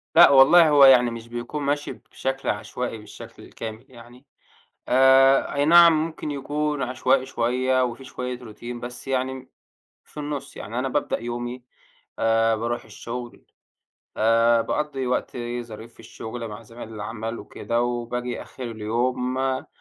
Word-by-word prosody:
لأ 175 - +9
والله، 150 +5 +7
هو 145 -2 +7
يعني 125 -3 +6
مش 115 0 -8
بيكون 120 +5 -5
ماشي 145 +1 -1
بشكل 135 0 -5
عشوائي 115 +3 -3
بالشكل 105 - -12
الكامل 110 +2 -8
يعني 120 +2 -15 0.6
آآ، 135 +1 +5
أي 145 - +1
نعم 170 +2 +8
ممكن 160 -2 -6
يكون 145 0 -2
عشوائي 130 +1 +1
شوية 130 +1 +1
وفي 125 +2 -5
شوية 125 -1 -5
روتين 120 +1 -8
بس 125 +2 -8
يعني 130 0 -2 0.6
في 150 - -10
النُصّ، 145 -1 -6
يعني 115 +4 -6
أنا 130 +1 -1
بابدأ 145 +2 -1
يومي 120 +1 -5 0.5
آآ، 115 0 +2
بارُوح 120 +2 -3
الشغل 120 +2 -8 0.7
آآ، 115 +1 +4
باقضّي 140 -2 -2
وقتي 120 -1 -3
ظريف 115 +1 -11
في - - -17
الشغل 115 0 -7
مع 105 +2 -9
زمايل 115 0 -11
العمل 110 +2 -5
وكده، 115 0 -3
وباجي 120 0 -3
آخر 130 - -10
اليوم 125 +4 -2
آآ، 130 0 -1
125 Hz, 140 wpm, -24 LUFS, 115-135 Hz, 0.7 s, لأ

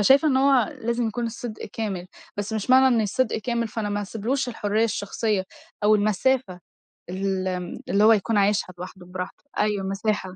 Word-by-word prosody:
فشايفة 275 +9 +5
إن 260 - +3
هو 270 +3 +4
لازم 235 0 0
يكون 235 +2 -2
الصدق 230 -1 -6
كامل، 195 -5 -3 0.3
بس 205 +2 -3
مش 220 +3 -2
معنى 260 -1 +6
إن - - +3
الصدق 220 +3 0
كامل 235 0 -1
فأنا 215 -1 -3
ما 205 0 -1
هاسيبلوش 230 +6 -2
الحرّية 215 -1 0
الشخصية 205 -1 -1 0.4
أو 215 +1 +6
المسافة 210 -1 +1 0.5
ال 190 +1 -1 0.5
اللي 200 +2 +3
هو 225 +1 +8
يكون 215 +1 +1
عايشها 200 -2 +2
لوحده 180 0 -9
براحته. 180 +1 -7 0.2
أيوَه 210 -2 +1
المِسَاحة. 195 -1 -2
215 Hz, 170 wpm, -24 LUFS, 195-235 Hz, 0.5 s, هو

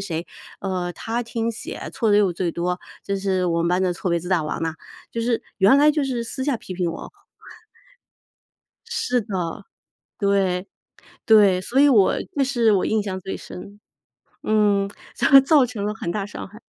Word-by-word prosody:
谁， 170 -3 -4 0.3
呃， 180 -2 -3
她 230 +5 -3
听 230 0 -2
写 230 +1 -7
错 225 - 0
的 205 - +5
又 200 -3 +3
最 175 0 -2
多， 180 +1 -2 0.3
就 200 - -2
是 190 -2 0
我 170 -1 0
们 170 - +1
班 180 +1 +1
的 180 -1 +1
错 180 - -4
别 170 0 +1
字 175 - -8
大 180 -4 +2
王 150 - -4
嘛。 160 0 -2 0.4
“就 230 - -3
是 230 0 0 0.2
原 200 +7 +6
来 295 +2 +6
就 300 -1 0
是 250 -3 -2
私 260 +3 -5
下 280 -4 0
批 190 - -9
评 175 -2 -1
我 - - -8 1.8
是 245 -1 -1
的， 185 -6 -4 0.5
对， 195 -3 +1 0.6
对， 205 -4 +5
所 255 +8 +1
以 290 - +7
我 210 -8 +5 0.2
这 275 - +3
是 240 -5 +2
我 195 - +2
印 215 -1 +1
象 190 -2 -4
最 190 +1 -5
深。 205 +3 -11 0.6
嗯， 205 -2 +2 0.6
造 280 -2 +5
成 225 -4 -5
了 210 - -1
很 195 - -4
大 200 0 -2
伤 205 - -8
害。 210 +3 -15
200 Hz, 195 characters per minute, -22 LUFS, 180-230 Hz, 1.8 s, 以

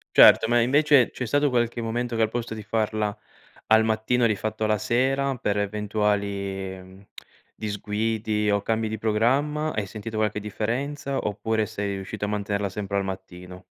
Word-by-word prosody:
Certo, - - +8
ma 120 +1 +3
invece 140 0 +4
c'è 125 - -4
stato 145 +3 +2
qualche 120 -1 0
momento 120 +1 -2
che 115 - +2
al 110 - +1
posto 120 0 -4
di 110 - -7
farla 110 -1 -1 0.5
al 110 0 +5
mattino 110 +2 +1
l'hai 110 -3 +1
fatto 110 +2 -3
la 110 0 +2
sera 135 +5 +1
per 105 -3 -1
eventuali 100 -2 -2 0.5
disguidi 105 0 -2
o 100 0 +1
cambi 110 0 0
di 110 - -3
programma? 135 +8 +1
Hai 105 -2 -2
sentito 110 +2 -6
qualche 105 -1 0
differenza 135 +7 -3
oppure 110 +1 -1
sei 100 -1 -3
riuscito 100 +2 -4
a - - -5
mantenerla 100 -1 -1
sempre 100 +1 -4
al 100 - -1
mattino? 90 -1 -8
110 Hz, 160 wpm, -25 LUFS, 100-120 Hz, 0.5 s, Certo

